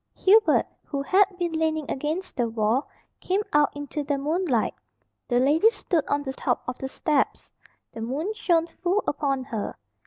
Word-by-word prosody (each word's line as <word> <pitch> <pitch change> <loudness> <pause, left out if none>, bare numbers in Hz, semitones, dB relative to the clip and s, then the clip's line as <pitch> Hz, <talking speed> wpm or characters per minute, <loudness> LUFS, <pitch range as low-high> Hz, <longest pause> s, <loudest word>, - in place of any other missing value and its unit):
Hubert, 425 +3 +5 0.2
who 280 -2 -3
had 390 +7 +5
been 350 -2 -1
leaning 320 -1 0
against 310 +7 -3
the 240 -3 0
wall, 225 +4 0 0.3
came 390 +3 0
out 295 -1 +5
into 290 +1 -4
the 285 0 -1
moonlight. 295 - 0 0.5
The 245 -1 +2
lady 300 - +5
stood 380 -7 -1
on 285 0 0
the 265 -1 -4
top - - -1
of 250 - -4
the 265 - -4
steps. 295 +1 -1 0.4
The 225 - -7
moon 290 - -2
shone 340 -6 +2
full 360 +4 -1
upon 275 -3 0
her. 225 -5 -5
295 Hz, 165 wpm, -25 LUFS, 265-350 Hz, 0.5 s, Hubert